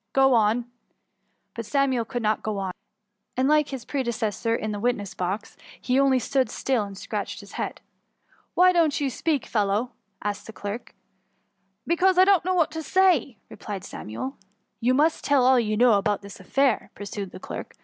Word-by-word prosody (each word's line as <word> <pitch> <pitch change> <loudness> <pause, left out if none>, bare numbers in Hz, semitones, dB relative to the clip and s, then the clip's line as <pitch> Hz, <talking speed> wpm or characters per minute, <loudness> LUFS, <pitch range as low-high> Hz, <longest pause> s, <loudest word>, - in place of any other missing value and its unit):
Gro 270 -1 +5
on." 225 +1 +3 0.9
But 230 - -5
Samuel 270 -4 +1
could 245 -1 -4
not 215 0 +1
go 215 -2 -3
mi; 185 - -3 0.7
and, 260 +1 +2
like 300 0 +4
his 265 -4 -6
predecessor 230 -4 -1
in 215 -1 -3
the 205 - -4
witnesa 210 -4 -1
box, 190 +4 -3 0.2
he 255 +1 +1
only 275 -1 +4
stood 260 +1 0
still 250 -6 0
and 200 -1 -9
scratched - - -4
his - - -14
head. - - -4 0.4
" - - -36
Why 365 +1 +6
don't 330 -5 +2
you 280 -2 0
speak, 300 +1 -1
fellow 205 0 +1
?^ 250 - -11 0.3
asked 205 0 -3
the 220 - -9
clerk. 205 +4 -6 0.4
<* 195 +1 -47
Because 360 +2 +3
I 370 - +7
doesn't 385 -4 +4
know 370 0 +1
what 335 -3 +2
to 320 0 -4
say,'' 330 - +2
re^^ - - -11
plied 200 -3 -6
Samuel. 120 - -6
^* - - -39 0.3
You 250 +2 +2
must 305 +3 +2
tell 280 -3 +3
all 260 0 +6
you 215 -2 0
know 240 0 +6
about 205 0 +1
this 200 0 -10
affair," 265 +6 +1
pursued 200 -1 -6
the - - -10
clerk. - - -7
240 Hz, 195 wpm, -25 LUFS, 205-280 Hz, 0.9 s, I